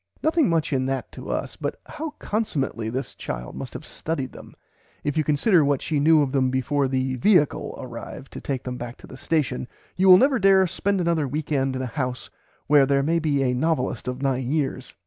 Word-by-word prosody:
Nothing 315 - +3
much 165 -3 +1
in 130 -1 +1
that 135 -1 -3
to - - -9
us, - - -3
but - - -4
how 310 0 -6
consummately 140 - -2
this 130 +4 -4
child 60 0 -6
must - - -7
have - - -7
studied 140 -5 -4
them; - - -13 0.5
if 145 - -1
you 155 - +2
consider 155 +4 +3
what 140 -2 +2
she 150 -2 -1
knew 155 +1 +5
of 135 - -2
them 130 -2 +2
before 135 +2 0
the 130 0 -1
"viacle" 155 - +2
arrived 125 +2 -8
to - - -7
take 135 -3 -3
them 125 -1 -5
back 120 0 -7
to - - -14
the - - -11
station 135 -3 -1 0.3
you 190 +1 +2
will 180 - +11
never 265 +3 +3
dare 195 -1 +5
to 170 - -6
spend 200 -1 0
another 165 -4 +1
week 150 +3 -4
end 135 -2 +1
in 130 - -2
a 125 +4 -7
house 125 0 -4 0.3
where 145 -2 +5
there 140 0 +2
may 165 +3 +2
be 145 -4 +1
a 125 -1 +1
novelist 130 -1 -1
of 125 +2 -4
nine 130 -1 0
years. 135 -4 -2
140 Hz, 220 wpm, -24 LUFS, 130-165 Hz, 0.5 s, will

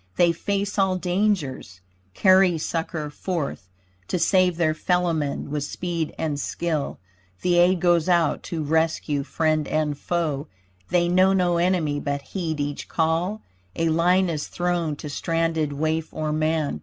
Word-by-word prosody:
They 175 -1 +4
face 200 +4 -2
all 190 -1 +3
dangers 180 - -1 0.4
carry 185 -2 +5
succor 160 -1 -3
forth 150 - -4 0.4
To - - -1
save 180 0 +3
their 160 -2 +2
fellowmen 160 -4 -1
with 150 -1 -1
speed 165 +1 -3
and 150 -3 -2
skill 155 0 -2 0.5
The 175 -1 +3
aid 175 0 +4
goes 175 -1 +3
out 170 -3 +2
to 165 -3 -2
rescue 160 -1 0
friend 155 +1 0
and 155 -1 0
foe. 150 -2 -2 0.4
They 175 -1 +2
know 185 +2 +4
no 180 -2 +2
enemy 170 -5 +1
but 140 -1 -3
heed 165 -5 -2
each 145 0 -3
call. 170 +6 0 0.3
A 165 0 +1
line 180 +4 +3
is 155 -3 -3
thrown 175 -3 -1
to 150 - -8
stranded 165 0 -1
waif 155 +2 -1
or 155 -1 -2
man. 155 -1 0
165 Hz, 145 wpm, -24 LUFS, 155-180 Hz, 0.5 s, carry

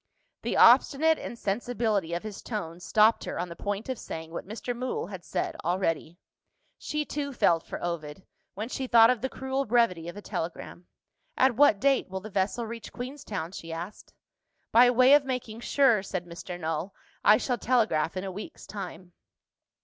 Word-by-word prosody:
The - - -2
obstinate 320 +3 +6
insensibility 220 -4 -2
of 175 - -4
his 215 -2 -7
tone 175 -7 -5
stopped 215 +5 +3
her - - -4
on 175 +1 -3
the 170 - -8
point 205 +3 -4
of 260 -3 -3
saying 160 0 -7
what 170 - -6
Mr. 230 +3 -4
Mool 255 +1 -3
had 185 -1 -8
said - - -3
already. 170 -1 -1 0.6
She, 300 0 -2
too, 285 -1 -4
felt 170 -10 +3
for - - -7
Ovid, 170 0 -5 0.3
when 215 +3 -4
she 260 +1 -4
thought 230 -1 +7
of 250 -4 -2
the 265 - -1
cruel 265 +1 -2
brevity 215 -9 +1
of 175 - -9
a - - -7
telegram. 175 +1 -6 0.5
"At 260 -2 +4
what 280 -6 +5
date 275 -2 +2
will 190 0 -4
the 210 +3 -10
vessel 200 +5 0
reach 230 0 -8
Queenstown?" 245 - -6
she 165 -3 -8
asked. 170 +5 -7 0.6
"By 245 +2 +7
way 255 +2 +6
of 290 -1 +6
making 250 -4 -4
sure," 240 -4 +3
said 185 -2 -4
Mr. 175 +1 -8
Null, 165 +3 -3 0.3
"I 210 +1 +7
shall 245 -1 -2
telegraph 215 -10 +1
in 185 - -3
a 195 - -4
week's 200 +3 -9
time." 180 -3 -8
210 Hz, 180 wpm, -28 LUFS, 175-245 Hz, 0.6 s, thought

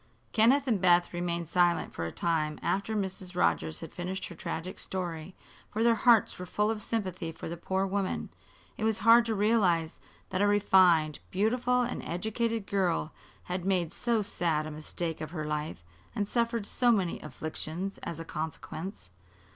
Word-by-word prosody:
Kenneth 250 +6 +4
and 220 -7 +1
Beth 175 -1 +4
remained 170 -1 -2
silent 175 0 +2
for 85 - -3
a - - -5
time 155 - 0
after 200 +3 0
Mrs. 190 -2 -3
Rogers 80 - +1
had - - -8
finished 185 +2 -4
her 170 - -9
tragic 165 +3 -5
story, 175 -2 -5 0.3
for 220 +2 -1
their 235 0 +6
hearts 230 -3 +4
were 180 - -6
full 210 +3 +1
of 215 -1 -3
sympathy 185 -7 -2
for - - -8
the 170 - -4
poor 190 +3 -1
woman. 195 0 -2 0.5
It - - -4
was 220 -1 +2
hard 230 +1 +7
to 225 - 0
realize 195 -6 +2 0.3
that 185 - 0
a 205 - +4
refined, 185 -6 +4
beautiful 245 +5 +2
and 245 - -3
educated 220 +4 -2
girl 180 -6 0 0.3
had 180 0 -3
made 180 -3 +1
so 235 -3 +1
sad 165 -5 0
a 155 - -5
mistake 155 +2 -4
of 155 - -4
her 155 -2 -4
life 150 - -3 0.3
and 205 - 0
suffered 235 -1 0
so 245 +3 +3
many 190 -6 +1
afflictions 155 +5 -5
as 165 - -6
a 165 - -6
consequence. 160 +5 -5
185 Hz, 170 wpm, -30 LUFS, 165-215 Hz, 0.5 s, hard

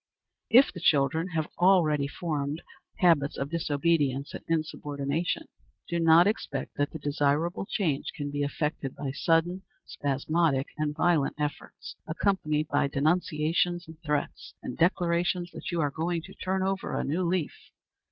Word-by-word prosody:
If 255 +4 +6
the 175 - -7
children 160 +1 +2
have 155 -1 0
already 165 -6 +4
formed 150 0 -3 0.3
habits 165 -6 +3
of 140 +1 -3
disobedience 145 -3 0
and - - -7
insubordination, 155 -1 -2 0.4
do 170 - -1
not 165 +1 +6
expect 210 +2 -2
that 145 0 +1
the - - -7
desirable 145 +5 0
change 160 -11 -1
can 145 -1 -4
be 145 0 -2
effected 145 -1 -2
by 140 -2 -4
sudden, 165 +6 +1 0.2
spasmodic, 140 0 0
and 150 -1 -2
violent 160 -3 +2
efforts, 150 -1 -5
accompanied 155 -3 0
by 145 -1 +2
denunciations 165 +3 0
and 160 0 -13
threats, 150 -2 -3
and - - -5
declarations 175 0 +1
that - - -7
you 170 -2 0
are 145 -2 0
going 165 +2 -2
to - - -11
"turn 190 0 -2
over 195 0 -2
a - - -1
new 160 +6 -1
leaf." 175 -3 0
160 Hz, 145 wpm, -28 LUFS, 145-175 Hz, 0.4 s, If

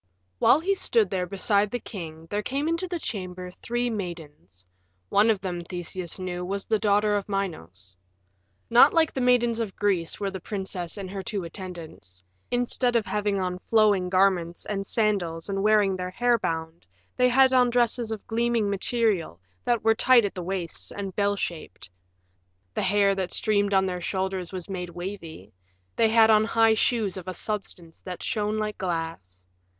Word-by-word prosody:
While 280 - +5
he 390 +4 +1
stood 435 +3 +2
there 180 -1 -1
beside 200 +2 +1
the 245 - -2
king 165 -8 -8
there 205 0 0
came 275 +7 -2
into 335 +3 -1
the 350 -1 -3
chamber 185 - -5
three 240 +6 -2
maidens; 150 - -7 0.4
one 210 +3 +4
of 210 -3 +2
them, 180 -3 -4
Theseus 175 0 -3
knew, 180 -1 -4
was 195 +2 -3
the 220 -1 +1
daughter 210 0 +2
of 205 0 -3
Minos. 100 - -4 0.7
Not 245 +7 +6
like 325 -1 +3
the 265 - -2
maidens 240 -2 +3
of 220 -4 -3
Greece 190 -5 0
were 200 -1 -2
the 190 - -6
princess 190 -2 -5
and 190 -2 -6
her 195 -1 -4
two 195 0 -4
attendants: 165 - -9 0.3
instead 245 0 +1
of 225 -2 +2
having 205 -1 -1
on 180 -1 -2
flowing 205 -4 +2
garments 185 -2 +1
and 195 -1 -3
sandals 195 -7 0
and 195 0 -1
wearing 210 -2 +3
their 180 0 -4
hair 240 +4 +1
bound, 160 -2 -4 0.3
they 250 0 +4
had 260 +1 +5
on 250 -1 +5
dresses 240 -1 +1
of 220 -2 -5
gleaming 230 -2 0
material 200 - 0 0.3
that 240 -3 +1
were 225 0 +5
tight 240 0 +5
at 200 - -3
the 180 - -5
waists 180 -2 -3
and 195 -2 -6
bell 205 0 +1
shaped; 160 - -6 0.8
the - - -1
hair 200 +1 +3
that 190 -2 -3
streamed 205 -1 +1
on 190 0 +4
their 180 -1 -3
shoulders 190 -1 -3
was 185 -3 -6
made 180 -2 -5
wavy; 170 - -8 0.4
they 225 - +3
had 225 0 +6
on 215 0 +5
high 225 0 +3
shoes 220 -3 0
of 185 - -8
a 185 - -4
substance 180 -5 -5
that 180 -2 -7
shone 210 0 -1
like 215 -1 -3
glass. 165 - -4
195 Hz, 175 wpm, -26 LUFS, 180-220 Hz, 0.8 s, Not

